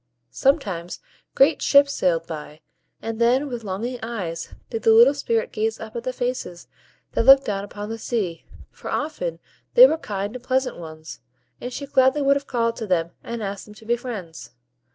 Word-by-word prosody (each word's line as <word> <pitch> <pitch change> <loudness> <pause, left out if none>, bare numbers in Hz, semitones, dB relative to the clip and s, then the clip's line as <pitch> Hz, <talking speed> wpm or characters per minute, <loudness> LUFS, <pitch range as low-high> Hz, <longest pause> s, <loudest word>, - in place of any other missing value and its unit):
Sometimes 195 - 0 0.4
great - - +4
ships 280 0 +5
sailed 165 -2 +1
by, 150 -1 -8 0.4
and 225 0 -4
then 255 +5 +3
with 240 -4 -5
longing 220 +6 -4
eyes 185 -8 -5 0.2
did 225 -2 -3
the 225 - +5
little 235 +5 +7
Spirit 230 -6 -1
gaze 220 +1 -2
up 220 +1 -9
at 235 - -3
the 255 - -1
faces 245 -8 -4 0.4
that - - 0
looked 270 +2 +8
down 200 -1 -2
upon 205 +1 -7
the 225 0 -5
sea; 200 -9 -2 0.3
for - - -9
often 400 +12 -3 0.4
they - - +11
were 325 -9 +2
kind 200 -2 -4
and 250 - -8
pleasant 260 +1 0
ones, 155 -2 -9 0.4
and 245 - -5
she 280 - -5
gladly 275 +1 +3
would 280 0 +4
have 280 0 -4
called 230 -2 0
to 220 - -5
them 170 -3 0
and 235 -1 -5
asked 200 -1 -5
them 210 - -14
to 220 - -16
be 235 +2 +2
friends. 180 - -8
230 Hz, 190 wpm, -23 LUFS, 195-260 Hz, 0.4 s, they